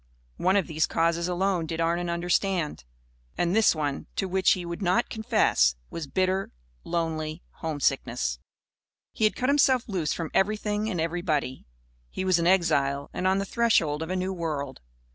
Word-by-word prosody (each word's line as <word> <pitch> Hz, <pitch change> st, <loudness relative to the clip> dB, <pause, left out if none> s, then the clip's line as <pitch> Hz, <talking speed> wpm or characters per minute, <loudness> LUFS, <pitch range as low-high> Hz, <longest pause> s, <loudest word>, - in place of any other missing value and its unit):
One 185 Hz, +2 st, +2 dB
of 200 Hz, -, +3 dB
these 160 Hz, -1 st, 0 dB
causes 170 Hz, +1 st, +1 dB
alone 180 Hz, -2 st, 0 dB
did 165 Hz, +1 st, -4 dB
Arnon 170 Hz, +1 st, 0 dB
understand. 175 Hz, -, -1 dB, 0.5 s
And 175 Hz, +2 st, +1 dB
this 220 Hz, -5 st, +5 dB
one 145 Hz, -3 st, -3 dB
to 190 Hz, -, -1 dB
which 190 Hz, 0 st, +3 dB
he 180 Hz, -2 st, -4 dB
would 170 Hz, +3 st, -5 dB
not 190 Hz, +6 st, +1 dB
confess 60 Hz, -, +2 dB, 0.2 s
was 165 Hz, -3 st, -5 dB
bitter, 185 Hz, +4 st, 0 dB, 0.3 s
lonely 160 Hz, -1 st, -3 dB
homesickness. 135 Hz, -, -1 dB, 0.7 s
He 220 Hz, -, +1 dB
had 215 Hz, -, +2 dB
cut 255 Hz, -, 0 dB
himself 270 Hz, -3 st, +4 dB
loose 180 Hz, -8 st, -1 dB
from 165 Hz, -2 st, -3 dB
everything 210 Hz, +1 st, 0 dB
and 180 Hz, -5 st, -2 dB
everybody. 160 Hz, -5 st, -1 dB, 0.4 s
He 190 Hz, -, -4 dB
was 185 Hz, -2 st, +3 dB
an 170 Hz, -, +1 dB
exile 140 Hz, -7 st, +2 dB
and 185 Hz, -, -1 dB
on 190 Hz, +1 st, +3 dB
the 195 Hz, -, -1 dB
threshold 180 Hz, -10 st, +2 dB
of 160 Hz, -, -4 dB
a 185 Hz, -, -1 dB
new 185 Hz, +1 st, -1 dB
world. 150 Hz, -6 st, -4 dB
175 Hz, 165 wpm, -27 LUFS, 155-190 Hz, 0.7 s, this